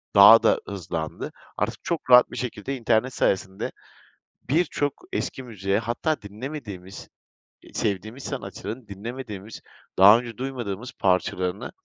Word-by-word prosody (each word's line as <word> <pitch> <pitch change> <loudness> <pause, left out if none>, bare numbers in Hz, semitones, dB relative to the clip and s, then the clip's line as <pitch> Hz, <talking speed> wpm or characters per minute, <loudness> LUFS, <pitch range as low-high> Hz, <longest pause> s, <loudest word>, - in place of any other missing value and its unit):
daha 105 +3 +10
da - - +4
hızlandı. 85 -5 -4 0.3
Artık - - -2
çok 165 -6 -3
rahat 125 0 +8
bir - - -7
şekilde 125 +1 -4
internet 120 +2 +1
sayesinde 95 -3 0 0.8
birçok 145 -2 +1 0.2
eski 130 - -3
müziğe 100 -3 -1
hatta 120 +7 -1
dinlemediğimiz, 105 -4 -8 0.5
e - - -17
sevdiğimiz 110 +6 -2
sanatçıların 110 -1 -6
dinlemediğimiz, 105 0 -7 0.4
daha 100 +4 +9
önce 120 -3 -8
duymadığımız 125 -4 -4
parçalarını 90 0 0
110 Hz, 115 wpm, -25 LUFS, 95-125 Hz, 0.8 s, daha